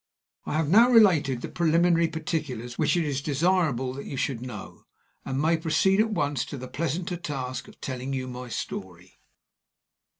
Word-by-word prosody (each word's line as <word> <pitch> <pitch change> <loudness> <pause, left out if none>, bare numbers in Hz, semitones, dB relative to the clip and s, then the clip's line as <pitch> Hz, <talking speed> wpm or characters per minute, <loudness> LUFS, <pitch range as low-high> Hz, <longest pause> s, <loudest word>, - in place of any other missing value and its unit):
I - - -2
have 155 0 +1
now 225 +9 +6
related 175 - +5
the - - -4
preliminary 170 0 +3
particulars 150 -7 -4
which - - +2
it 170 - +1
is 140 -2 -2
desirable 145 -4 +1
that 140 - -7
you 135 - -5
should 125 -3 -1
know, 120 -6 -9 0.4
and 135 0 -3
may 160 +3 +3
proceed 180 +5 +2
at 220 +1 +3
once 145 - 0
to 140 - -7
the 130 0 -7
pleasanter 170 +6 -3
task 130 -6 -5
of - - -16
telling 130 0 -4
you 130 -1 -3
my 125 0 -7
story. 90 -5 -7
145 Hz, 170 wpm, -26 LUFS, 130-170 Hz, 0.4 s, now